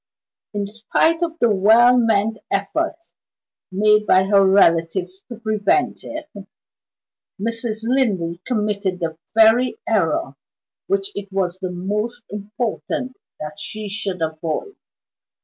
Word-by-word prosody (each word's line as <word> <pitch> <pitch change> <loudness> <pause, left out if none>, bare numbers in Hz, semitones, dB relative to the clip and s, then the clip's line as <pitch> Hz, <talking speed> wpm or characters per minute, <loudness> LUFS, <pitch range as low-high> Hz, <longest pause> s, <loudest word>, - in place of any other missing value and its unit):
In 205 -1 -1
spite 230 +10 +1
of 335 -1 -2
the 235 -8 +3
well 225 +5 +6
meant 220 -2 +2
efforts 320 - -2 0.6
made 210 +2 +3
by 185 0 +5
her 195 0 +4
relatives 185 0 +2
to 240 - -6
prevent 220 +2 +1
it, 305 +1 -7 1.1
Mrs. 230 0 -3
Linley 200 -9 0
committed 210 -5 -1
the 160 -2 -4 0.2
very 225 - +5
error - - 0 0.5
which 395 +1 -1
it 200 - -7
was 185 -2 -1
the 185 -1 -3
most 210 +7 -3
important 235 +6 -4 0.2
that 150 0 -7
she 215 -1 -5
should 195 -4 -2
avoid. 160 - -3
210 Hz, 115 wpm, -21 LUFS, 190-240 Hz, 1.1 s, well